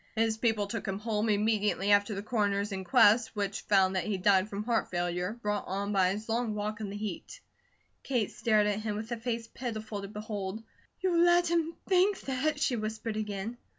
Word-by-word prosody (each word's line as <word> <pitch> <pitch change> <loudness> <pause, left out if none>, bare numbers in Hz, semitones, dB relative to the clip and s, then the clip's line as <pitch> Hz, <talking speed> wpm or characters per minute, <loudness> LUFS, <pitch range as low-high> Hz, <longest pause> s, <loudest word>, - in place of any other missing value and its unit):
"His 225 0 +2
people 220 -3 +1
took 220 +2 -5
him 195 0 -2
home 215 0 -1
immediately 210 -1 +1
after 205 +1 +3
the 195 - -4
Coroner's 205 -2 0
inquest, 220 +4 +4
which 200 -1 -2
found 190 -2 +3
that 185 - 0
he 210 -2 -1
died 195 +1 +3
from 205 0 -4
heart 230 0 0
failure, 175 +2 -1
brought 210 0 -1
on 200 +2 -2
by 190 -2 +4
his 210 +3 -4
long 230 -1 -1
walk 210 +1 -3
in 205 - -3
the 200 - -5
heat." 205 -4 -6 0.6
Kate 245 -6 -1
stared 215 -2 +2
at 205 0 0
him 215 -1 -3
with 220 +3 -6
a 235 - -1
face 230 0 -3
pitiful 220 -3 -5
to 200 - -6
behold. 210 0 -5 0.4
"You 355 -2 +2
let 345 0 +4
him 335 -1 0
think 380 +1 +3
THAT?" 270 +3 -1
she 280 -7 +1
whispered 215 0 -3
again. 215 +2 -4
215 Hz, 195 wpm, -30 LUFS, 200-230 Hz, 0.6 s, inquest